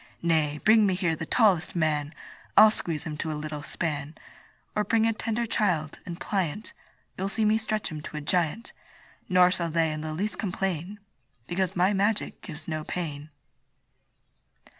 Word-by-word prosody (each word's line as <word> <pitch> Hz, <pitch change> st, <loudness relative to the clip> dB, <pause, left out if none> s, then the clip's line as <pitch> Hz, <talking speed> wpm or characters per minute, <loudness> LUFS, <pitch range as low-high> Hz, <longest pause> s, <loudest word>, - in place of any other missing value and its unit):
Nay, 155 Hz, -3 st, +1 dB
bring 220 Hz, -1 st, +6 dB
me 185 Hz, -, +1 dB
here 175 Hz, -3 st, 0 dB
the 160 Hz, -, -6 dB
tallest 200 Hz, -9 st, +3 dB
man, 150 Hz, -3 st, 0 dB, 0.5 s
I'll 215 Hz, 0 st, +9 dB
squeeze 165 Hz, -7 st, -2 dB
him 150 Hz, -1 st, -5 dB
to 160 Hz, 0 st, -3 dB
a 150 Hz, -, -3 dB
little 150 Hz, 0 st, -5 dB
span; 150 Hz, -1 st, -3 dB, 0.6 s
Or 210 Hz, -, +2 dB
bring 225 Hz, +1 st, +2 dB
a 225 Hz, -, +2 dB
tender 230 Hz, +2 st, -2 dB
child, 180 Hz, -9 st, 0 dB
and 170 Hz, -1 st, -6 dB
pliant, 195 Hz, +1 st, -2 dB, 0.4 s
You'll 190 Hz, +1 st, -2 dB
see 220 Hz, +1 st, 0 dB
me 215 Hz, +1 st, +3 dB
stretch 215 Hz, -1 st, -2 dB
him 155 Hz, -1 st, -5 dB
to 155 Hz, -, -7 dB
a -, -, -3 dB
giant: 175 Hz, -, -1 dB, 0.6 s
Nor 180 Hz, -1 st, +6 dB
shall 170 Hz, -3 st, -1 dB
they 160 Hz, 0 st, +1 dB
in 155 Hz, -, -5 dB
the 155 Hz, 0 st, -4 dB
least 205 Hz, +6 st, -2 dB
complain, 190 Hz, 0 st, -2 dB, 0.5 s
Because 180 Hz, +4 st, -1 dB
my 185 Hz, +3 st, +3 dB
magic 205 Hz, +2 st, 0 dB
gives 155 Hz, -3 st, -9 dB
no 155 Hz, -2 st, -3 dB
pain. 155 Hz, -3 st, -5 dB
175 Hz, 170 wpm, -27 LUFS, 155-210 Hz, 0.6 s, I'll